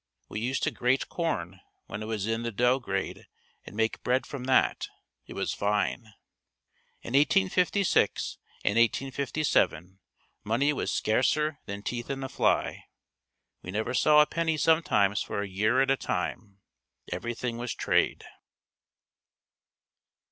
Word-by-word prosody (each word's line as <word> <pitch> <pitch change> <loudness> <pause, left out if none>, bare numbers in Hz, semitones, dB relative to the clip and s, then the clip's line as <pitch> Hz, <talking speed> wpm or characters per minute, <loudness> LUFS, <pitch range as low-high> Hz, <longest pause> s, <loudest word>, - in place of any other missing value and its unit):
We - - -4
used 125 +4 -1
to - - +2
grate 125 +2 0
corn 95 - -3 0.3
when 105 - -6
it 110 - -5
was 110 -3 -2
in 115 +1 -1
the 120 0 -3
dough 125 +5 +2
grade 100 -6 -4 0.4
and - - -10
make 110 +1 0
bread 125 +1 +1
from 135 -3 -6
that. 130 0 +2 0.4
It - - -9
was - - -1
fine. 105 +2 -1 0.9
In 120 - -7
1856 185 +6 +2 0.3
and 105 +3 +3
1857 125 - 0 0.4
money 120 +8 +1
was - - -2
scarcer 145 +6 +1
than 100 0 -6
teeth 120 +1 -4
in 135 -1 -3
a 135 - -4
fly. - - 0 0.8
We - - -10
never 110 +6 -2
saw 150 +3 +6
a - - +5
penny 160 0 -1
sometimes 110 -12 +3
for 100 - -3
a - - -5
year 105 +7 +2
at 135 - +1
a 135 - +3
time. 100 -5 -4 0.5
Everything 120 +5 -3
was 120 0 -3
trade. - - +1
120 Hz, 140 wpm, -28 LUFS, 105-140 Hz, 0.9 s, saw